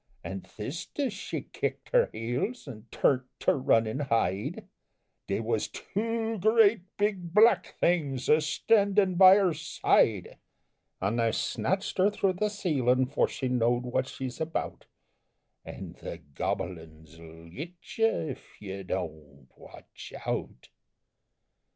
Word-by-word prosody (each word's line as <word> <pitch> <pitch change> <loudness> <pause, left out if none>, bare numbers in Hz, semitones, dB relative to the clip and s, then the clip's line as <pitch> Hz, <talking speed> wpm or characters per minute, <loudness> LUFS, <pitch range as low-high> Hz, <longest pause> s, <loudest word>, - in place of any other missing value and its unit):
An' 95 0 -5
thist 130 - -7
as 270 -6 0
she 200 - -5
kicked - - -4
her - - +3
heels, 125 - -3
an' 115 -3 -10
turn't 130 -2 +1
to - - +3
run 115 -4 +3
an' 110 +5 -3
hide, 115 -7 -1 0.6
They 100 - -1
was 110 -1 -1
two 225 +1 -3
great 220 0 +4 0.2
big 195 -4 -1
Black 225 +3 +5
Things 145 -7 +1
a 155 +1 +5
standin' 200 +4 +2
by 185 +1 +8
her 195 -4 +3
side, 115 - +1 0.6
An' 100 +5 -1
they 115 -1 +2
snatched 190 - -2
her 190 +2 +5
through 195 -2 0
the 210 +4 0
ceilin' 130 - +1
'fore - - +2
she 130 - -4
know'd 120 0 +1
what 125 +1 -1
she's 130 0 -6
about, 160 +1 -4 0.8
An' - - -9
the - - -6
gobble 80 +4 -4
uns 80 0 -16
'll 80 0 -13
git 160 - -8 0.2
you 225 - +6 0.2
Ef - - -13
you 95 -1 -6
Don't 75 -7 -6
Watch - - -13
Out! 60 - -4
135 Hz, 140 wpm, -28 LUFS, -, 0.8 s, by